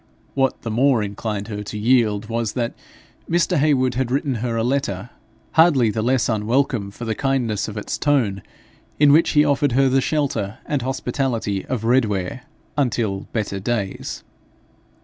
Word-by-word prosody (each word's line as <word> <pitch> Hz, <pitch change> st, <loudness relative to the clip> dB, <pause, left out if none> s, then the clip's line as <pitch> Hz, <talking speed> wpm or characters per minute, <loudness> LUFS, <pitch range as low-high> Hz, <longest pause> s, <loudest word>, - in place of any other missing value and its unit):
What 135 Hz, -1 st, 0 dB
the 115 Hz, -, -3 dB
more 125 Hz, 0 st, +3 dB
inclined 105 Hz, 0 st, -4 dB
her 105 Hz, -1 st, -4 dB
to 105 Hz, +1 st, -6 dB
yield 110 Hz, -2 st, +2 dB
was, 115 Hz, -1 st, -2 dB
that 120 Hz, -2 st, -2 dB, 0.6 s
Mr. 170 Hz, 0 st, +2 dB
Heywood 135 Hz, -4 st, +2 dB
had 125 Hz, 0 st, -1 dB
written 135 Hz, +1 st, 0 dB
her 115 Hz, -1 st, -1 dB
a 115 Hz, -, +1 dB
letter, 120 Hz, -5 st, -1 dB, 0.4 s
hardly 150 Hz, -9 st, +4 dB
the 110 Hz, -, -2 dB
less 125 Hz, +2 st, +2 dB
unwelcome 115 Hz, -1 st, 0 dB
for 110 Hz, +4 st, -8 dB
the 110 Hz, -, -1 dB
kindness 125 Hz, -6 st, -1 dB
of 105 Hz, -1 st, -7 dB
its 105 Hz, -, -4 dB
tone, 120 Hz, -10 st, +1 dB, 0.6 s
in 145 Hz, -1 st, +6 dB
which 160 Hz, +3 st, +4 dB
he 150 Hz, -1 st, +5 dB
offered 145 Hz, -2 st, +2 dB
her 135 Hz, +1 st, +4 dB
the 135 Hz, +1 st, +3 dB
shelter 130 Hz, -10 st, -1 dB
and 145 Hz, -3 st, -1 dB
hospitality 125 Hz, -5 st, -2 dB
of 125 Hz, -4 st, -2 dB
Redware 115 Hz, -3 st, +1 dB, 0.3 s
'until 115 Hz, -8 st, -1 dB
better 105 Hz, -3 st, -2 dB
days.' 100 Hz, -2 st, -3 dB
120 Hz, 160 wpm, -21 LUFS, 105-135 Hz, 0.6 s, in